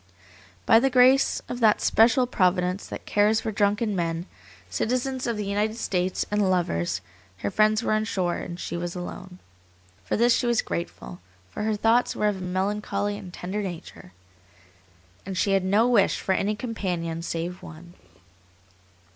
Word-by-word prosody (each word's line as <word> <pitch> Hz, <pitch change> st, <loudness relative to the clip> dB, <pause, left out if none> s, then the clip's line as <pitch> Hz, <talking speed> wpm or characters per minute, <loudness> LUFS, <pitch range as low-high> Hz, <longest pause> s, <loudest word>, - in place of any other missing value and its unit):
By 225 Hz, -, +6 dB
the 270 Hz, +3 st, +2 dB
grace 260 Hz, +1 st, +4 dB
of 245 Hz, -, -5 dB
that 220 Hz, -3 st, +4 dB
special 240 Hz, +3 st, +4 dB
Providence 185 Hz, -3 st, 0 dB
that -, -, -8 dB
cares 210 Hz, +2 st, +3 dB
for 225 Hz, 0 st, -3 dB
drunken 205 Hz, +1 st, +1 dB
men, 165 Hz, -1 st, -2 dB, 0.4 s
citizens 255 Hz, +2 st, -2 dB
of 235 Hz, -2 st, -1 dB
the 210 Hz, -, -3 dB
United 210 Hz, +3 st, -1 dB
States, 185 Hz, -4 st, -1 dB
and 210 Hz, -2 st, +2 dB
lovers, 90 Hz, -, 0 dB, 0.4 s
her 100 Hz, -, 0 dB
friends 215 Hz, +1 st, +3 dB
were -, -, +1 dB
on 215 Hz, 0 st, +1 dB
shore, 180 Hz, -5 st, -1 dB
and 175 Hz, 0 st, -7 dB
she -, -, -5 dB
was 175 Hz, +1 st, -4 dB
alone. 180 Hz, +1 st, -7 dB, 0.7 s
For 90 Hz, -, -1 dB
this 235 Hz, +2 st, +4 dB
she 245 Hz, -, 0 dB
was 235 Hz, -1 st, +2 dB
grateful, 170 Hz, -, -6 dB, 0.3 s
for -, -, -6 dB
her 215 Hz, 0 st, 0 dB
thoughts 225 Hz, +3 st, +2 dB
were 210 Hz, -, +1 dB
of 205 Hz, -, -3 dB
a -, -, -8 dB
melancholy 200 Hz, +2 st, -2 dB
and 195 Hz, -3 st, -9 dB
tender 185 Hz, +4 st, -4 dB
nature 175 Hz, -, -8 dB, 1.1 s
and 190 Hz, -1 st, -6 dB
she 200 Hz, -, +1 dB
had 195 Hz, -1 st, +2 dB
no 205 Hz, +5 st, +3 dB
wish 235 Hz, -6 st, +3 dB
for 190 Hz, -, 0 dB
any 205 Hz, +3 st, 0 dB
companion 180 Hz, -8 st, -3 dB
save 170 Hz, +2 st, -4 dB
one. 170 Hz, +2 st, -12 dB
200 Hz, 165 wpm, -25 LUFS, 180-220 Hz, 1.1 s, By